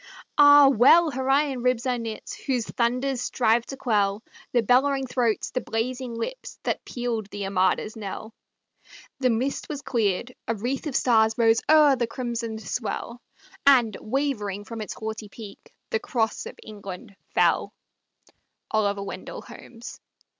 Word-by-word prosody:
Ah, 290 -1 +8
well 275 +6 +6
her 265 0 -3
iron 275 -2 +2
ribs 250 0 +1
are 250 -2 0
knit, 225 -2 -6
Whose 250 -4 0
thunders 250 +3 -1
strive 235 -2 +1
to 270 - -7
quell 210 -4 0 0.3
The 240 -2 +2
bellowing 270 +4 +3
throats, 245 -3 0
the 255 - -2
blazing 245 +2 -3
lips, - - -6
That - - -2
pealed 235 -4 -3
the 205 -1 -5
Armada's 195 +2 0
knell! 220 +1 -7 0.9
The 255 -2 +2
mist 245 +4 -1
was 290 -2 -5
cleared, 230 0 -1
a 230 - 0
wreath 250 +8 -3
of 275 - -4
stars 220 -2 +3
Rose 225 -1 +4
o'er 305 -3 +7
the 235 -1 0
crimsoned 230 -2 -4
swell, 235 +3 -4 0.5
And, 245 -6 +5
wavering 215 -6 -2
from 230 0 -7
its 210 - -6
haughty 220 -1 -6
peak, 205 -1 -12 0.2
The 220 - +1
cross 225 -1 -1
of - - -10
England 205 0 -9 0.2
fell! - - +3 1.0
Holmes. 215 +3 -4
235 Hz, 140 wpm, -25 LUFS, 220-260 Hz, 1.0 s, Ah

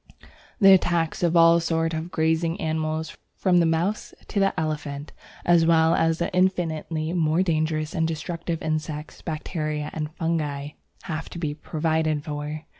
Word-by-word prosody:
The 195 -3 +8
attacks 170 -3 +1
of 170 -1 +2
all 165 0 +7
sorts 165 0 0
of 160 +2 -3
grazing 160 0 0
animals, 160 0 -2 0.2
from 180 -2 +3
the 170 - +3
mouse 170 +6 -1
to 205 - -1
the 195 -3 +1
elephant, 150 -2 -4 0.3
as 170 -1 +5
well 165 0 +4
as 165 -1 +2
the 170 - -2
infinitely 165 -3 0
more 165 0 +2
dangerous 155 -2 -1
and 165 -3 +1
destructive 165 +1 -4
insects, 155 -1 -4
bacteria, 155 -2 -3
and 155 -1 -3
fungi, 150 -4 -2 0.3
have 160 -1 -5
to - - -8
be 155 -4 -2
provided 155 0 -1
for. 150 +1 -5
160 Hz, 150 wpm, -25 LUFS, 155-170 Hz, 0.3 s, The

